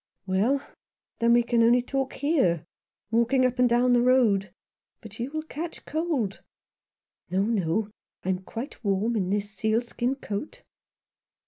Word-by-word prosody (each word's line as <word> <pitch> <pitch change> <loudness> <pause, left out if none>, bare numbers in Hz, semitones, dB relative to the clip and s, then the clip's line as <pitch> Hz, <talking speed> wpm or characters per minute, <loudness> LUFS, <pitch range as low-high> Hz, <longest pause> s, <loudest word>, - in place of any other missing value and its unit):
"Well, 215 +9 +1 0.5
then 235 0 +4
we 240 0 +5
can 235 0 +2
only 240 +2 +5
talk 270 +1 -2
here 260 - +1 0.2
— - - -54
walking 235 +3 +3
up 250 0 -1
and 250 -1 +5
down 245 +1 +3
the 240 - +4
road. 230 -7 +3 0.5
But 215 0 -12
you 240 +3 -2
will 310 +1 -4
catch 320 +2 -7
cold." 300 - -2 0.4
" - - -58
No, 190 +2 +1
no; 210 -1 0 0.3
I - - -1
am 185 -1 +1
quite 235 - -7
warm 205 +3 +1
in 190 -4 0
this 205 +1 -1
sealskin 235 +4 -1
coat." 270 - -6
235 Hz, 155 wpm, -26 LUFS, 205-255 Hz, 0.5 s, we